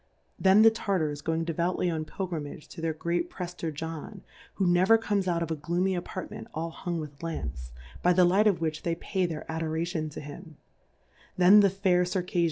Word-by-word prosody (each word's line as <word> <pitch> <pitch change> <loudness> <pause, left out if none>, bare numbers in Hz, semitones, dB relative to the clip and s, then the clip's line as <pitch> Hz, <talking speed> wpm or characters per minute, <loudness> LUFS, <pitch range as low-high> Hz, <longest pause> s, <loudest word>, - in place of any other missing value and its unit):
Then 195 +3 +6
the 225 - +8
Tartars 175 -9 -1
going 165 +1 -1
devoutly 170 +2 -1
on 155 -1 -3
Pilgri 175 -2 -4
mage 145 +1 -9
to 170 - -9
their 165 0 0
Great 170 +2 -2
Prefier 175 -2 -5
John^ 160 +6 -6 0.3
who 195 - 0
never 180 +5 +5
comes 205 -4 -1
out 170 -1 +1
of 165 - -5
a - - 0
Gloomy 175 +5 0
Appart 180 0 -5
ment - - -8
all 165 +1 -3
hung 170 0 -4
with 145 -2 -8
Lamps, 70 - -5 0.3
by 180 - +4
the 180 0 +5
Light 195 +5 +4
of 195 -5 +2
which 155 -1 -2
they 170 -1 -1
pay 185 +1 -1
their 160 -3 -5
Adora 160 0 -2
tion 160 -3 -3
to 145 - -8
him: 150 +2 -10 0.8
Then 185 +3 +8
the 200 -1 +6
fair 185 -2 +2
Circajfia? 180 0 -2
170 Hz, 200 wpm, -28 LUFS, 160-185 Hz, 0.8 s, the